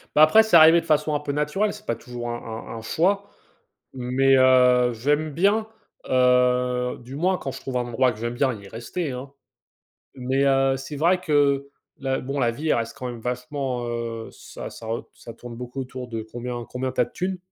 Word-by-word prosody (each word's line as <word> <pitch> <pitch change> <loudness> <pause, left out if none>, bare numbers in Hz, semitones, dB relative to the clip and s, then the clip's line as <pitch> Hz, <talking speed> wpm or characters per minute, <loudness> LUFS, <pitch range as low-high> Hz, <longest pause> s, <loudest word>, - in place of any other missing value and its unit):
Bah, 155 - +7
après 220 +8 +7
c'est 220 - +2
arrivé 165 +1 +8
de - - -14
façon 155 -1 +1
un - - +1
peu 145 -1 -4
naturelle, 150 +9 0
c'est - - -12
pas 115 - -1
toujours 120 0 -7
un 120 - -2 0.4
un - - -6
un 115 - -7
choix 195 - 0 0.7
mais, 135 +2 +3
heu, 125 -1 +5
j'aime 145 +6 0
bien, 200 +7 +2 0.4
heu, 125 -1 +2
du 130 +3 -9
moins 180 +4 +1
quand 135 - -5
je 135 - -9
trouve 130 -2 -3
un 120 0 -2
endroit 125 +2 +2
que 105 - -13
j'aime 120 +1 -3
bien 130 0 +1
y 100 - -12
rester, 130 - -4
hein. 130 +2 -7 0.8
Mais, 130 +1 -1
heu, 135 0 +3
c'est 135 +3 -7
vrai 175 +5 +3
que 140 -4 +2 0.3
la 135 -1 -1
bon 140 +2 -4
la 120 - +3
vie 150 +5 -1
reste 115 +2 -3
quand 130 - -5
même 120 -1 -7
vachement, 125 +1 -3
heu, 115 -1 -4
ça - - -9
ça 115 - -11
re 115 +1 -3
ça 115 - -11
tourne 120 0 -10
beaucoup 125 +2 -6
autour 125 -1 -7
de 115 -2 -4
combien 120 +2 -6
combien 130 +1 -3
tu - - -1
as - - +5
de - - -18
tunes. 185 +1 -3
130 Hz, 210 wpm, -24 LUFS, 120-150 Hz, 0.8 s, arrivé